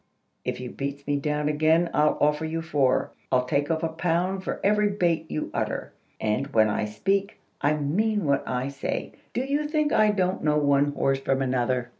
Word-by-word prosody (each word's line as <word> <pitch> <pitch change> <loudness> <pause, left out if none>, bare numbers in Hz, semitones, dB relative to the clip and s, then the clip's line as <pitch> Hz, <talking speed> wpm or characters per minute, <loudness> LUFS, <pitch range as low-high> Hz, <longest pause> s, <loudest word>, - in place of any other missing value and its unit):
If - - -3
you 125 -1 -6
beat 140 0 -5
me 145 0 0
down 150 +1 -1
again, 160 +3 +2
I'll 150 0 +3
offer 150 +1 +2
you 165 +1 -3
four. 145 -5 +1 0.2
I'll 125 -1 +3
take 145 +2 0
off 160 0 0
a - - +2
pound 175 +3 -1
for - - -3
every 210 +1 +3
bate 170 -5 0
you 155 - -3
utter; - - -3 0.3
and, 110 +5 0
when 110 -6 +3
I 105 - 0
speak, 195 - -1 0.2
I 145 - +3
mean 190 +8 0
what 140 -1 +2
I 125 +1 -1
say. 140 0 -4 0.2
Do 245 - +1
you 285 +3 -1
think 305 -1 +1
I 215 0 +5
don't 185 -2 0
know 150 -1 +3
one 145 -1 +3
horse 135 -1 +1
from 135 0 0
another?" 125 -1 0
150 Hz, 195 wpm, -26 LUFS, 140-180 Hz, 0.3 s, I